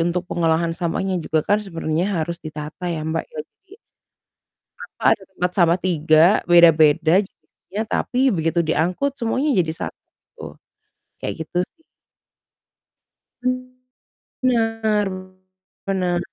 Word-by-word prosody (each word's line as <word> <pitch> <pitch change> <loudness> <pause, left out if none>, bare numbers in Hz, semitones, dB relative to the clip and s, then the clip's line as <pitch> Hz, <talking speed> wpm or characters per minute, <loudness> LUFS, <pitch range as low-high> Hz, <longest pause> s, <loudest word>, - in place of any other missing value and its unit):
untuk 175 +2 0
pengolahan 165 -1 0
sampahnya 180 +2 -2
juga 155 -1 -1
kan 205 +1 +2
sebenarnya 165 -1 -2
harus 170 +1 -6
ditata 155 +3 -6
ya 160 -2 -3
Mbak, 160 +1 -2
ya, 480 -1 -11 0.2
jadi 390 +1 -18 1.0
apa, - - 0
ada 200 - -21
tempat 180 -1 -1
sampah 175 0 +4
3 160 -3 +3 0.2
beda-beda 165 -2 +5
jenisnya 200 +2 -8
tapi 260 +2 +1
begitu 165 -2 0
diangkut 180 - 0
semuanya 260 +4 0
jadi 160 -2 -1 0.2
satu, - - -14 0.6
kayak 160 - -4
gitu 175 - -3
sih. 325 - -35 2.6
Benar 225 -4 +1 0.8
benar. 180 -3 0
175 Hz, 110 wpm, -21 LUFS, 160-205 Hz, 2.6 s, beda-beda